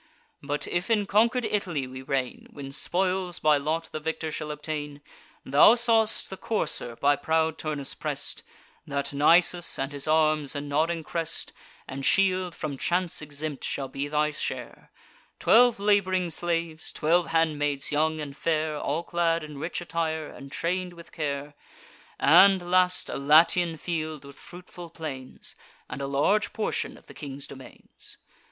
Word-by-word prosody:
But, 145 +1 -2
if 175 +4 -2
in 215 -3 +2
conquer'd 230 +5 +2
Italy 175 -10 -1
we 130 0 -8
reign, 130 -2 -3
When 135 -1 -8
spoils 180 +4 0
by 155 -1 +4
lot 155 +3 -2
the 155 - -4
victor 160 0 -3
shall 155 0 -4
obtain— 150 -1 -5 0.5
Thou 145 - +7
saw'st 230 -2 +2
the 190 - -6
courser 120 - -2
by 145 +4 +3
proud 160 +2 0
Turnus 145 -3 -3
press'd: - - -4 0.5
That, 140 0 -2
Nisus, 170 +4 +4
and 135 +1 -2
his 145 0 -4
arms, 155 -2 +2
and 145 0 -4
nodding 160 +3 0
crest, 165 0 -4 0.3
And 135 +1 -6
shield, 185 +1 +2
from 140 -3 -5
chance 175 -1 0
exempt, 150 -1 -4
shall 135 - -2
be 140 +2 -3
thy 150 +1 +1
share: 150 - -6 0.5
Twelve 245 +1 +5
lab'ring 190 -3 +2
slaves, 165 -1 -2
twelve 165 +1 +2
handmaids 145 -3 0
young 155 +1 +1
and 145 -2 -6
fair 155 -1 -1
All 150 +5 -2
clad 170 -1 0
in 150 -2 -8
rich 165 +4 -3
attire, 160 -2 -2
and 140 0 -11
train'd 180 +3 -2
with 170 -1 -14
care; 145 -1 -4 0.7
And, 180 0 +6
last, 180 0 +3
a - - -4
Latian 165 +4 +4
field 155 -3 -4
with 140 0 -13
fruitful 175 -1 -11
plains, 140 -6 -7 0.3
And 125 +2 -6
a 140 - -2
large 150 +10 +1
portion 220 - -2
of - - -19
the - - -13
king's 140 -1 -7
domains. 135 -1 -13
155 Hz, 155 wpm, -27 LUFS, 145-175 Hz, 0.7 s, Thou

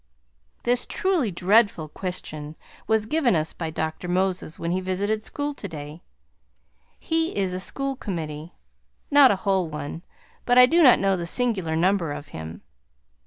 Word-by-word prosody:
This 245 0 +2
truly 360 - 0
dreadful 195 -2 +2
question 155 -3 -5 0.3
was 220 -1 +2
given 265 - +2
us 155 0 -1
by 165 -2 -4
Dr. 160 +2 -4
Moses 180 -2 -1
when 170 - -3
he 185 +1 0
visited 200 +4 -1
school 290 +4 -3
today. 160 - -8 1.0
He 325 0 -1
is 190 -2 0
a 185 - -3
School 275 +8 -2
Committee; 160 - -6 0.6
not 285 -2 +7
a 205 - +3
whole 190 -4 +1
one 150 +1 -6 0.4
but 245 0 +2
I 250 - +10
do 335 +7 +3
not 260 -6 +7
know 195 0 +1
the 170 -2 -4
singular 190 -8 0
number 175 -2 +1
of 145 0 -9
him. 80 +2 -8
185 Hz, 155 wpm, -24 LUFS, 160-240 Hz, 1.0 s, I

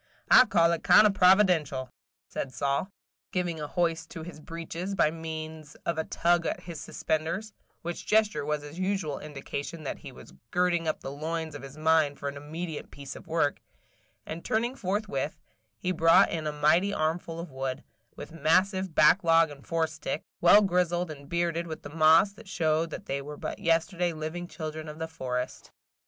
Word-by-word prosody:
I 255 - +9
call 170 -6 +3
it 170 - -1
kind 215 - +7
o' 210 - +5
providential," 180 -9 +3 0.4
said 135 - -4
Sol, 140 +8 -1 0.4
giving 175 -3 -1
a 150 - -3
hoist 165 -1 -1
to 160 - -7
his 165 -2 -9
breeches 165 +4 -5
by 155 - +3
means 160 -2 -7
of 170 -2 -1
a - - +1
tug 170 0 +1
at - - -3
his 170 -3 -8
suspenders, 170 +7 -2 0.3
which 175 0 -5
gesture 210 -8 +3
was 150 0 -2
his 145 +4 -9
usual 185 -6 -1
indication 150 +2 -6
that 140 - -4
he - - -9
was - - -14 0.2
girding 175 -2 +1
up 155 - -1
the 135 - -5
loins 160 +2 -4
of 145 - -8
his 135 +2 -10
mind 155 -2 +3
for 140 - -5
an 140 - -4
immediate 155 +3 -6
piece 140 -1 -9
of - - -12
work; 155 -3 0 0.6
and, 165 +2 -6
turning 235 +3 0
forthwith, 185 - -2 0.4
he 180 - -2
brought 175 +2 +5
in 160 -2 -2
a - - 0
mighty 155 +7 +3
armful 165 -1 -2
of 170 -3 -7
wood, 130 -1 -4 0.3
with - - -9
massive 185 +3 +1
back 155 +6 +6
log 165 -1 +5
and 140 -1 -13
fore 165 -1 +1
stick, 155 -1 -5 0.2
well 205 +5 +7
grizzled 180 -2 +1
and 140 -2 -11
bearded 170 -1 0
with 160 -1 -7
the - - -7
moss 160 +6 +5
that 200 -1 -14
showed 160 -2 +1
that - - -7
they 140 0 -2
were 145 +1 -8
but - - -5
yesterday 170 +1 +1
living 160 +3 -5
children 155 -2 -6
of 150 - -8
the 160 0 -4
forest. 125 -5 -4
160 Hz, 185 wpm, -28 LUFS, 150-175 Hz, 0.6 s, I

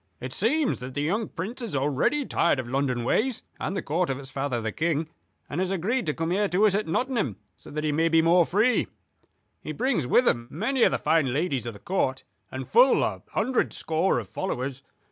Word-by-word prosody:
"It 125 +1 -6
seems 270 +6 +1
that 125 +1 -8
the 145 - -1
young 205 +7 0
Prince 215 +10 -6
is 225 -10 -4
already 145 - +1
tired 170 -10 +2
of 130 -2 -4
London 130 -1 0
ways 230 - 0 0.2
and 195 - -2
the 185 - -3
Court 170 +3 0
of 135 - -1
his 135 -1 -10
father 135 -3 -2
the 110 -1 -3
King, 160 +3 -1 0.4
and 145 - -4
has 185 - 0
agreed 195 +4 -1
to 150 - +1
come 165 +1 -2
here 205 +3 +2
to 195 +4 +3
us 210 - +4
at 210 -1 0
Nottingham 220 - 0 0.2
so - - -15
that 150 +1 -4
he 155 - +1
may 165 +3 +2
be 165 0 +4
more 170 +1 +5
free. 215 +9 +2 0.7
He - - -5
brings 245 - 0
with 245 - +4
him 120 0 +1
many 230 - -1
of - - +6
the - - +1
fine 155 -6 +2
ladies 140 -4 -1
of 115 - -5
the - - -12
Court; 135 - -1 0.3
and 130 -1 -5
full 250 +3 +5
a - - -2
hundred 255 -1 +1
score 165 +4 0
of - - -4
followers. 135 -7 -4
165 Hz, 220 wpm, -26 LUFS, 135-210 Hz, 0.7 s, of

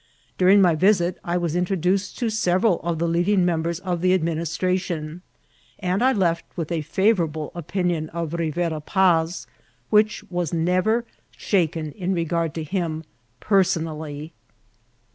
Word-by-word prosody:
During 190 +2 +6
my 175 -2 +5
visit 180 +1 +2
I 175 +1 -1
was 170 -2 -1
introduced 185 +1 0
to 235 -3 -1
several 185 -2 +2
of 170 -1 -2
the 170 +2 0
lead 170 +3 +1
ing 195 -4 +3
members 170 -1 -1
of 180 -3 -2
the 185 +1 +4
administration, 170 0 -2 0.6
and 185 +1 -1
I 260 - +5
left 175 -7 +1
with 165 -1 -3
a 165 -2 0
feivourable 165 -2 0
opinion 175 -2 -2
of 165 -1 -4
Rivera 165 -1 -1
Paz, 175 -1 +1 0.5
which 210 0 +3
was 175 -3 -1
never 185 +8 +1 0.3
sha 185 -5 +2
ken 155 -1 -6
in 185 +3 -2
regard 165 -1 -1
to 160 - -3
him 160 -1 -3 0.4
personally. 160 -6 -1
175 Hz, 145 wpm, -23 LUFS, 165-185 Hz, 0.6 s, During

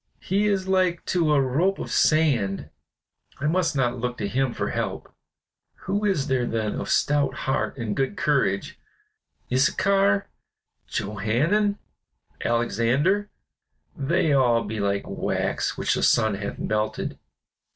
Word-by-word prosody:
"He 200 +3 0
is 195 -2 0
like 185 -2 +1
to 165 -4 +2
a 150 - +4
rope 150 +9 +1
of - - -6
sand; 135 -12 +2 0.7
I 140 - -3
must 165 0 +1
not 125 -2 0
look 125 +1 -3
to 105 - -2
him 135 +3 0
for - - -3
help. - - -4 0.7
Who 200 +2 -1
is 185 -9 +1
there 130 -4 0
then 110 -2 -1
of - - -6
stout 145 -1 +2
heart 135 0 -1
and 115 -4 -3
good 135 -1 -1
courage? 120 -10 0 0.7
Issachar 195 +9 +2 0.6
Johanan 130 - 0 0.7
Alexander? 125 - +1 0.7
they 155 +2 +1
all 120 -4 +3
be 110 +1 -5
like 100 0 0
wax - - -2
which - - +1
the - - -1
sun 110 -2 +3
hath 100 +1 -5
melted. 110 0 -2
135 Hz, 130 wpm, -24 LUFS, 115-185 Hz, 0.7 s, a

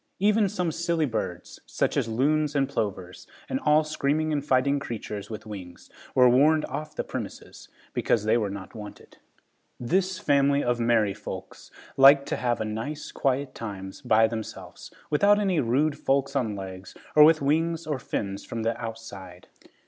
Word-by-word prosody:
Even 205 +1 +3
some 180 -5 -1
silly 165 0 0
birds, 95 -8 -5
such - - -1
as - - 0
loons 145 +6 +1
and 135 -1 +2
plovers 95 -8 -4 0.2
and 265 - -2
all 155 - +4
screaming 155 +1 -1
and 145 -2 -1
fighting 140 0 +2
creatures 105 -5 -6
with 110 -1 -7
wings, 95 -5 -10 0.2
were 125 -1 +7
warned 150 +5 +4
off 155 0 -6
the - - -2
premises, - - -8 0.2
because 110 - +1
they 110 - +2
were 110 -4 0
not 95 -1 -8
wanted. 105 -3 -11 0.6
This 185 +9 0
family 140 -2 +2
of 120 0 0
merry 115 -4 +2
folks - - -9 0.3
liked 140 +1 +7
to - - -1
have 120 -3 0
a 110 - -2
nice, 115 +8 -5
quiet 135 0 -1
time 100 -4 -6
by 110 +1 +4
themselves, 110 -1 -6 0.2
without 200 +7 +4
any 195 -5 +1
rude 140 +5 +1
folks 135 +1 0
on 115 -6 0
legs, 95 -1 -8 0.2
or 150 - +9
with 155 +1 +6
wings 165 +3 +1
or 150 -3 -2
fins 100 -4 -4
from 115 -1 -5
the 115 +1 0
outside. 100 -6 -9
130 Hz, 165 wpm, -26 LUFS, 110-155 Hz, 0.6 s, or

